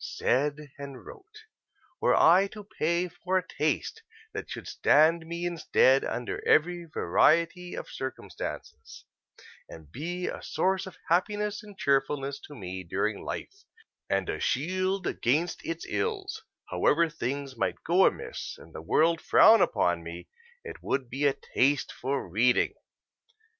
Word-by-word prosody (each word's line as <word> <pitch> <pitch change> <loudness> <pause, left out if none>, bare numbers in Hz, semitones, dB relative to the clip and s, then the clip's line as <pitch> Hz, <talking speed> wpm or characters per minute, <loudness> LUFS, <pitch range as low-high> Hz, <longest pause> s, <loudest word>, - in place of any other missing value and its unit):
said 145 +2 -1
and 140 -2 -9
wrote: 430 +2 -13 0.6
"Were - - +4
I 185 +4 +6
to 210 -1 -9
pay 175 -4 -1
for 180 +2 -2
a 185 -1 -2
taste 445 - -2 0.3
that - - -6
should - - -7
stand 160 +2 +3
me 170 +1 -4
in 175 -1 -3
stead 135 -2 +4
under 120 - -4
every 175 +2 +2
variety 170 - +2
of - - -6
circumstances 130 0 -7 0.6
and 80 -2 -12
be 175 - -4
a - - -4
source 190 0 0
of 190 - -11
happiness 205 +4 0
and 205 -3 -14
cheerfulness 140 -1 0
to 145 - -11
me 95 -5 -6
during 100 +4 -2
life, 400 +1 -6 0.5
and - - 0
a - - -3
shield 185 +5 0
against 155 +8 0
its 165 0 -4
ills, 435 -1 -2 0.3
however 165 +2 +3
things 140 -2 -4
might - - -2
go - - +5
amiss - - -4
and 80 - -16
the - - -7
world 160 - +2
frown 225 +1 +7
upon 85 -1 +2
me, 85 +1 -8 0.4
it - - -9
would 130 -3 -2
be 140 +3 +1
a 135 - 0 0.2
taste 140 +1 +2
for 135 -3 -3
reading. 115 +8 +2
160 Hz, 145 wpm, -28 LUFS, 135-180 Hz, 0.6 s, frown